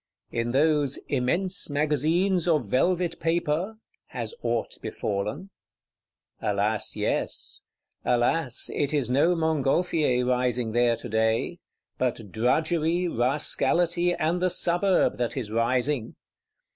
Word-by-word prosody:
In 115 0 -1
those 145 +1 +2
"immense 170 +10 +1
Magazines 155 +5 +1
of 155 -7 +2
velvet 175 - +1
paper" 170 +4 -1 0.3
has - - -5
aught - - -2
befallen? 105 - -4 0.9
Alas, 105 +1 0
yes! - - -3 0.4
Alas, 125 +2 +1
it 145 +1 0
is 130 -4 0
no 155 +7 +3
Montgolfier 155 -4 +1
rising 125 -2 0
there 120 0 +3
today; 110 0 -1 0.4
but 115 -5 -2
Drudgery, 160 - +1
Rascality 170 +6 +1
and 165 +3 0
the 185 - +2
Suburb 175 +2 +2
that 120 +1 -2
is 110 -5 -3
rising! 120 +2 0
145 Hz, 105 wpm, -26 LUFS, 120-170 Hz, 0.9 s, no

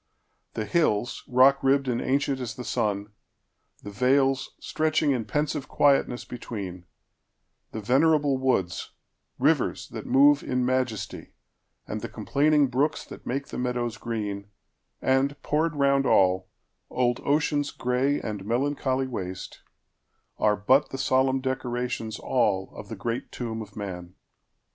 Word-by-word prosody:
The 110 - -2
hillsRock 130 0 +3
ribbed 135 0 +2
and 120 -1 0
ancient 140 0 0
as 120 -3 -5
the 125 - -6
sun; 105 -2 -2 0.7
the 100 - -7
valesStretching 135 +5 +1
in 120 -4 -2
pensive 145 +4 -1
quietness 135 -3 +2
between; 100 -7 -7 0.9
The 110 - -5
venerable 140 +3 +3
woods—rivers 95 -9 -1
that - - -7
moveIn 140 -2 +4
majesty, 125 -3 -2 0.5
and - - -4
the - - -5
complaining 150 0 +2
brooksThat 140 +5 -2
make 140 +3 -3
the - - -5
meadows 120 -2 -2
green; 105 -4 -4 0.6
and, 135 +2 +2
poured 155 +1 0
round 140 -1 +3
all, 95 -2 +3 0.4
Old 120 -1 0
Ocean's 145 0 +1
gray 125 +4 0
and 105 -3 -5
melancholy 130 +3 0
waste,—Are 105 0 -5
but 130 +8 +3
the 135 - -5
solemn 130 0 +2
decorations 125 -3 -3
allOf 100 -7 -1
the 110 - -6
great 115 +4 -4
tomb 115 -2 -4
of 105 -1 -10
man! 90 -3 -6
125 Hz, 115 wpm, -26 LUFS, 110-140 Hz, 0.9 s, moveIn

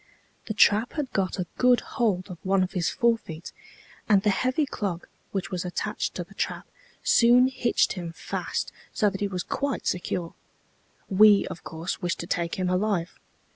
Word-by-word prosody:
The 215 - -3
trap 210 +2 +4
had 290 -5 -3
got 195 -1 0
a 180 - -1
good 250 -1 +5
hold 200 -5 -1
of 175 - -9
one 190 0 +2
of 185 - -3
his 175 -3 0
forefeet, 225 -9 -1 0.6
and 200 -2 +5
the 210 - +4
heavy 255 +8 +1
clog, 195 -9 -4 0.3
which 195 -2 -3
was 180 -2 -2
attached 180 -1 -3
to - - -3
the - - -17
trap, - - -3 0.4
soon 245 +2 +5
hitched 260 -2 +1
him 175 -3 -5
fast, 165 - -4 0.2
so 210 -2 +2
that 195 - -6
he 205 - +1
was 185 -2 -3
quite 280 -1 -2
secure. 175 -1 -2 0.7
We, 205 0 +6
of - - -8
course, 165 +4 -5
wished 175 -2 -1
to - - -5
take 170 -1 -1
him 185 -1 -1
alive. 180 -2 0
195 Hz, 175 wpm, -26 LUFS, 180-230 Hz, 0.7 s, We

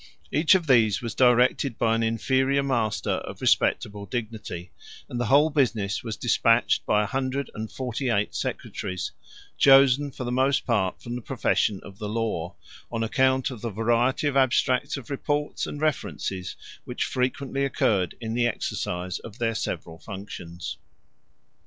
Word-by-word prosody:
Each 155 +7 +5
of 180 -3 +1
these 110 -8 +4
was 115 - -3
directed 125 0 +3
by 115 -1 +2
an 115 - +1
inferior 130 +5 +1
master 120 -6 0
of - - -8
respectable 100 -1 +1
dignity, 105 -5 -5 0.4
and 120 - -5
the 120 - 0
whole 145 +6 +5
business 115 -8 0
was 115 -3 -4
despatched - - +3
by 105 0 +3
a - - -1
hundred 135 +4 -2
and 110 0 -6
forty 130 0 -3
eight 105 -3 +1
secretaries, 90 -1 -4 0.5
chosen 135 +1 +6
for 130 - -7
the 120 - -3
most 130 +2 +2
part 100 -7 0
from 120 - -5
the 125 - -4
profession 110 -5 0
of 100 +1 -12
the 105 -2 -4
law, 105 -7 -2 0.4
on 115 -1 -1
account 130 +3 +2
of 120 -5 -8
the 115 - -2
variety 120 +6 +1
of 145 -1 0
abstracts 130 +1 +2
of 135 0 -9
reports 145 +1 -2
and 145 - -6
references 95 - -2 0.3
which - - -3
frequently 135 +2 -1
occurred 100 -8 +1
in 115 -2 -4
the 120 0 +2
exercise 90 -5 -3
of 110 -1 -11
their 115 -2 0
several 80 -6 -4
functions. 95 -4 -7
120 Hz, 160 wpm, -26 LUFS, 105-135 Hz, 0.5 s, chosen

